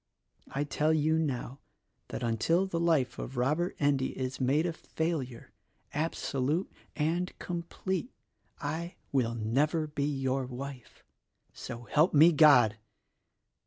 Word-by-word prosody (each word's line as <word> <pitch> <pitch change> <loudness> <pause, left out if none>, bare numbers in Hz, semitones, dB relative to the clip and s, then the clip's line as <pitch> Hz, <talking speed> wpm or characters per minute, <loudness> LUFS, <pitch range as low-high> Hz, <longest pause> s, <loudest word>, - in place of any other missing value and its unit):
' - - -39
I 140 - -1
tell 155 +2 +1
you 155 +1 +2
now 135 -3 -3 0.5
that - - -5
until 120 - +2
the 175 -3 -2
life 150 -8 +1
of 130 - -6
Robert 150 +9 +1
Endy 140 -2 +1
is 130 0 -3
made 140 +6 +2
a 170 - -1
failure, 160 -8 -4 0.4
abso 150 -3 -2
lute 155 +8 0 0.2
and 170 +4 -1
complete, 180 +5 -4 0.5
I 165 +4 -4 0.2
will 120 -4 +1
never 140 +9 +1
be 145 -2 -2
your 135 -2 -1
wife: 130 -1 -8 0.5
So 120 +1 -7
help 150 - +2
me 160 +4 +8
God! 140 -9 +6
145 Hz, 130 wpm, -30 LUFS, 130-160 Hz, 0.5 s, me